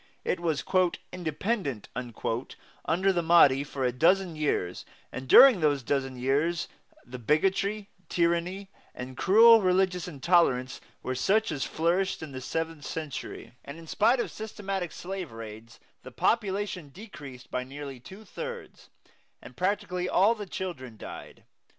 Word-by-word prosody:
It 185 - 0
was 160 -4 -1 0.5
"independent" 175 - -3
under 125 - -3
the 175 - +1
Mahdi 160 -5 +5
for 140 -2 -5
a 125 - +2
dozen 170 +6 +2
years, 145 -12 -1 0.3
and 130 0 -7
during 260 - +9
those 145 -4 +1
dozen 135 0 -1
years 145 +7 0 0.4
the 125 +1 -8
bigotry, 195 - +1 0.2
tyranny, 175 +3 0 0.2
and 130 +1 -7
cruel 225 - +7
religious 185 -1 +1
intolerance 140 -5 +1 0.2
were 130 - -2
such 205 - +1
as 140 -5 -2
flourished 175 +3 0
in 155 - -7
the 130 -1 -7
seventh 160 +2 -4
century, 155 -6 -6
and 140 +3 -9
in 165 - -11
spite 225 +9 +2
of - - -2
systematic 195 -5 -5
slave 185 -4 -6
raids 115 0 -10 0.2
the - - -10
population 200 -7 -1
decreased 140 - -11
by 125 - -2
nearly 135 0 -8
two 190 - -13
thirds, 480 - -8 0.5
and - - -13
practically 185 -1 -1
all 200 +5 +4
the 210 -3 -7
children 145 -12 -6
died. - - -10
170 Hz, 140 wpm, -28 LUFS, 135-195 Hz, 0.5 s, during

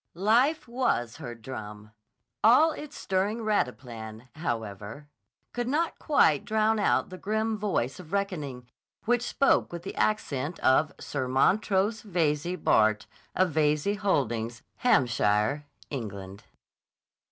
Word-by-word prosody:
Life 245 - +2
was 230 - -1
her 120 -1 -7
drum. 105 -3 -9 0.5
All 255 +9 +6
its 300 -1 -8
stirring 200 +4 -1
rataplan, 120 - -3
however, 115 - -5 0.5
could 240 -1 -2
not 315 +5 0
quite 160 - +3
drown 220 0 +1
out 205 - +1
the 185 - -8
grim 220 +2 -1
voice 195 - -1
of 160 -4 -12
reckoning, 155 -11 -3 0.4
which 240 +1 +2
spoke 275 +3 +2
with 170 0 -6
the 195 - -6
accent 160 -7 -1
of 145 +4 +3
Sir 130 -3 -3
Montrose 200 - +2
Veyze, 170 -3 -1
Bart., 110 0 +3 0.3
of 185 -2 +2
Veyze 150 +6 +1
Holdings, 120 - -1
Hampshire, 120 - +2 0.3
England. 100 -7 -6
155 Hz, 120 wpm, -28 LUFS, -, 0.5 s, All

